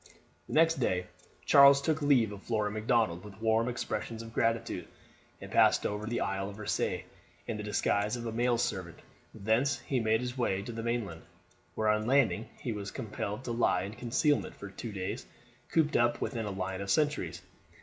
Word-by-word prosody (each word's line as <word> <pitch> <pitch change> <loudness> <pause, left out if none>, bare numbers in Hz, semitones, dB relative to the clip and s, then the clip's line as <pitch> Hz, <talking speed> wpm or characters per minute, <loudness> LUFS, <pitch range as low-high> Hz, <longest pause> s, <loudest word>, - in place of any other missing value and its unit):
The - - -7
next 165 -1 +4
day 90 -7 0 0.4
Charles 140 0 +8
took 155 +2 0
leave 130 -7 +4
of 100 -1 -8
Flora 105 -2 -1
Macdonald 110 -5 +1
with 105 -1 -11
warm 115 +1 +2
expressions 115 -1 -4
of 115 0 -11
gratitude, 115 0 0 0.5
and - - -10
passed - - +4
over 105 +1 -2
to - - -2
the 120 - -1
Isle 95 0 -1
of 100 - -10
Rasay, 105 - -1 0.4
in 115 - -3
the - - -4
disguise 105 +1 0
of 120 -1 -6
a 115 - -2
male 120 +1 +1
servant. 95 -7 -2 0.3
Thence 115 +7 +1
he 130 - -1
made 110 0 +2
his 125 0 -4
way 100 -6 0
to 120 - -6
the 115 0 -5
mainland, 115 -8 -2 0.5
where 110 - 0
on 105 +1 +1
landing 125 -4 +2
he 120 - -3
was 100 -2 -4
compelled 105 +2 -5
to 120 - -4
lie 115 -6 +2
in 100 +2 -6
concealment 125 +6 0
for 100 - -9
two 115 +3 -6
days 95 -2 -4 0.4
cooped 155 -2 +2
up 120 0 +3
within 115 -2 -2
a - - -3
line 95 -1 -3
of 100 - -5
sentries. 100 - 0
110 Hz, 190 wpm, -31 LUFS, 100-120 Hz, 0.5 s, Charles